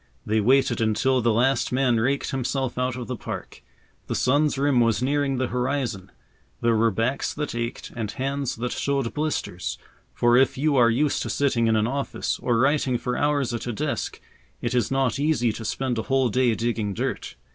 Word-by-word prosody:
They 110 0 +1
waited 125 +1 +3
until 125 +4 +2
the 115 0 +2
last 125 +4 +2
man 125 -2 +2
raked 135 +5 0
himself 130 0 -2
out 125 0 -1
of 125 -1 -5
the 125 - -4
park. - - -7 0.5
The - - -2
sun's 145 +2 +2
rim 140 -2 +2
was 115 0 +2
nearing 140 0 +1
the 130 0 -1
horizon. 125 -5 -2 0.5
There 115 -1 +2
were 115 +1 +3
backs 115 +6 -1
that 150 -1 -3
ached 120 0 -4
and 110 -3 -3
hands 135 +2 -2
that 120 +2 -3
showed 140 -4 -1
blisters, 150 - -3 0.3
for 120 0 +3
if 130 0 +3
you 145 +1 +1
are 120 -3 +5
used 140 +6 +1
to - - -3
sitting 125 -5 +1
in 110 - +3
an 110 0 +2
office, 135 +4 -2
or 120 -2 +1
writing 135 0 +2
for 125 +1 -3
hours 145 -4 +1
at 120 - -4
a 120 - -2
desk, - - -3 0.4
it 120 - -2
is 125 -1 +1
not 135 -2 0
easy 140 -7 +1
to 115 - -7
spend 120 +2 -2
a 110 - -6
whole 135 -2 +3
day 125 0 +2
digging 110 -4 -2
dirt. - - -3
125 Hz, 195 wpm, -24 LUFS, 115-135 Hz, 0.5 s, are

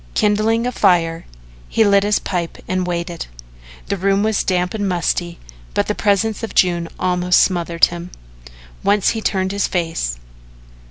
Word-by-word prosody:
Kindling 215 +3 +2
a 250 - 0
fire, 170 -6 +1 0.4
he 225 - +3
lit 200 -1 +4
his 205 +1 +2
pipe 175 -3 -3
and 185 -1 -1
waited. 170 -1 -4 0.6
The 200 - -2
room 195 +2 +1
was 215 -1 +1
damp 180 -1 0
and 205 -3 -1
musty, 175 -1 -1 0.4
but - - +2
the - - -1
presence 210 +1 +1
of 225 - -6
June 175 -2 +2
almost 180 -1 +2
smothered 170 -2 +3
him. 175 +1 -7 0.7
Once 205 -1 +3
he 225 - -2
turned 190 -2 0
his 200 0 0
face. 165 - -2
185 Hz, 155 wpm, -19 LUFS, 175-205 Hz, 0.7 s, lit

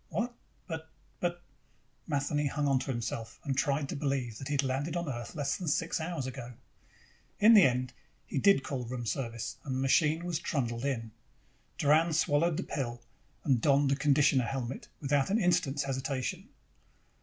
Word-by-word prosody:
"What? 240 +2 -2 0.3
But 160 -2 -6 0.3
but 175 0 -2 0.3
" 125 +2 -39
Matheny 145 0 0
hung 145 +1 -1
onto 135 -1 +1
himself 115 -2 -4
and 135 -2 -1
tried 140 0 +1
to - - -3
believe 135 -6 -2
that 135 - -6
he 145 - -1
had 140 - +2
landed 135 +5 -1
on 170 -1 -2
Earth 120 -5 -5
less 140 -2 0
than 180 - -5
six 165 +3 0
hours 160 -4 -3
ago. 125 -2 -6 0.9
In 220 +3 +8
the 210 - +9
end, 125 0 0 0.3
he 140 - -2
did 195 -4 +5
call 135 -3 -3
room 120 0 -4
service 115 0 -3
and 135 -2 -3
the - - -1
machine 155 +5 +3
was 170 -3 -1
trundled 120 -6 -2
in. 115 -5 -2 0.7
Doran 155 +3 +4
swallowed 155 +1 +2
the - - -1
pill 120 -5 -4 0.4
and 130 -5 +2
donned 140 +1 +4
the - - +4
conditioner 140 -2 +3
helmet 130 -1 -4
without 140 +1 +1
an 205 - +3
instant's 150 -7 +2
hesitation. 135 - -3
140 Hz, 175 wpm, -31 LUFS, 130-155 Hz, 0.9 s, the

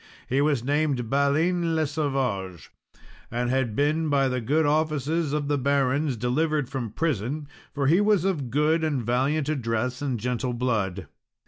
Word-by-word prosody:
He 135 +3 +1
was 145 -5 +1
named 140 -4 0
Balin 160 +5 +2
le 160 -1 +2
Savage, 130 - -2 0.6
and 120 +1 -1
had 130 -5 0
been 155 +3 +1
by 135 -2 +2
the 125 -1 -2
good 150 +7 +1
offices 155 +1 0
of 150 -1 -1
the 145 -1 +1
barons 140 0 +1
delivered 145 +5 0
from 130 -5 -3
prison, 145 +2 -2 0.2
for 140 -1 -2
he 170 +8 +4
was 205 -4 +3
of 155 -10 -1
good 150 +5 +2
and 145 -6 0
valiant 135 +6 0
address 125 -3 -1
and 130 -5 -2
gentle 125 +2 -2
blood. 105 -7 -1
140 Hz, 155 wpm, -25 LUFS, 125-155 Hz, 0.6 s, he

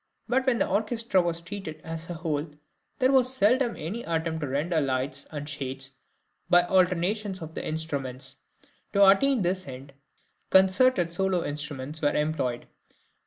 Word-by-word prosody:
But 260 +1 +1
when 250 -3 +3
the - - +1
orchestra 215 0 +1
was 170 -1 -1
treated 170 -3 -7
as 165 +1 -5
a 175 - -4
whole 160 -2 -2 0.5
there 260 -1 +3
was 255 -2 +4
seldom 250 +1 +3
any 190 +10 -4
attempt 165 -3 -2
to 145 - -2
render 155 +5 0
lights 135 +1 -1
and 145 -1 -6
shades 135 -2 -3 0.6
by 175 0 +6
alternations 185 +2 +1
of 160 -1 -8
the - - -5
instruments; 140 -4 -4 0.6
to 200 0 +6
attain 240 +4 +4
this 185 0 -1
end, 135 +1 -9 0.6
concerted 190 -1 +4
solo 190 -1 +1
instruments 145 0 -4
were 145 -1 +1
employed. 150 -6 -1
170 Hz, 150 wpm, -27 LUFS, 145-200 Hz, 0.6 s, by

